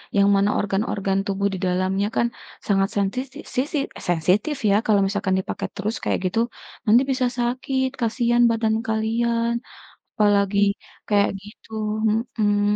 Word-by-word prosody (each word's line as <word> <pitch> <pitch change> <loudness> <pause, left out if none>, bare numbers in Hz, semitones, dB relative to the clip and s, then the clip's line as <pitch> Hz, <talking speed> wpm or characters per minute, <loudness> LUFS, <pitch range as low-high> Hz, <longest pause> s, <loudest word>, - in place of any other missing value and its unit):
yang 200 0 +5
mana 200 +1 +3
organ-organ 195 -1 0
tubuh 200 0 0
di 190 - -4
dalamnya 185 +2 0
kan 235 - +3 0.4
sangat 195 -1 +2
sentisi 250 +7 -2 0.2
sisi 280 +4 0 0.3
sensitif 185 - +2
ya 200 - +4
kalau 205 -2 +4
misalkan 200 -1 0
dipakai 190 - -4
terus 210 +3 -2
kayak - - 0
gitu, 185 +5 0 0.5
nanti 225 +3 +6
bisa 255 -1 +1
sakit 255 +2 0
kasihan 240 +1 +2
badan 220 -1 +1
kalian 230 +1 0 0.6
apalagi 205 -1 +2 0.5
kayak 205 -1 +3
gitu, 210 +3 -15 0.7
mhm. 205 -1 +3
210 Hz, 130 wpm, -23 LUFS, 195-235 Hz, 0.7 s, nanti